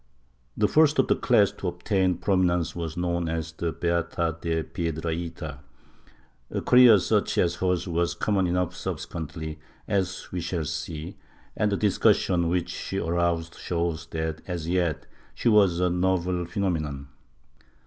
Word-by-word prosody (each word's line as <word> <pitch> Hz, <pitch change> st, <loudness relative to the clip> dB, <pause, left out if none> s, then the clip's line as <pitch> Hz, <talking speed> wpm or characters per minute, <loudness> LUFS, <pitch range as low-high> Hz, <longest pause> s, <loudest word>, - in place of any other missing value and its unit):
The 105 Hz, -, +3 dB
first 155 Hz, +2 st, +4 dB
of 135 Hz, -, +3 dB
the -, -, +3 dB
class 105 Hz, -5 st, +3 dB
to 90 Hz, -, -4 dB
ol^tain 95 Hz, 0 st, 0 dB
prominence 90 Hz, -4 st, +1 dB
was 85 Hz, -2 st, -4 dB
known 85 Hz, -1 st, -1 dB
as 80 Hz, 0 st, -3 dB
the 80 Hz, +1 st, -3 dB
Beata 85 Hz, -1 st, -1 dB
de 80 Hz, -1 st, -1 dB
Piedrahita. 80 Hz, -2 st, -4 dB, 0.9 s
A -, -, -3 dB
career 125 Hz, -3 st, +7 dB
such 105 Hz, +2 st, 0 dB
as 85 Hz, 0 st, +2 dB
hers 90 Hz, 0 st, 0 dB
was 85 Hz, 0 st, 0 dB
common 95 Hz, 0 st, +1 dB
enough 90 Hz, 0 st, -1 dB
subsequently, 80 Hz, -1 st, -5 dB, 0.3 s
as 95 Hz, -3 st, -1 dB
we 90 Hz, -, -3 dB
shall 85 Hz, -1 st, -2 dB
see, 75 Hz, +1 st, -5 dB, 0.4 s
and 105 Hz, -1 st, +1 dB
the 100 Hz, -, +1 dB
discussion 90 Hz, -3 st, +2 dB
which 90 Hz, 0 st, 0 dB
she 95 Hz, -, -4 dB
aroused 85 Hz, -1 st, 0 dB
shows 85 Hz, -2 st, -2 dB
that 80 Hz, 0 st, -3 dB
as 85 Hz, -3 st, -4 dB
yet 85 Hz, -4 st, 0 dB, 0.3 s
she 120 Hz, -, +1 dB
was 100 Hz, -5 st, +4 dB
a 90 Hz, -1 st, +2 dB
novel 90 Hz, -1 st, 0 dB
phenomenon. 80 Hz, -7 st, -2 dB
85 Hz, 145 wpm, -26 LUFS, 80-95 Hz, 0.9 s, career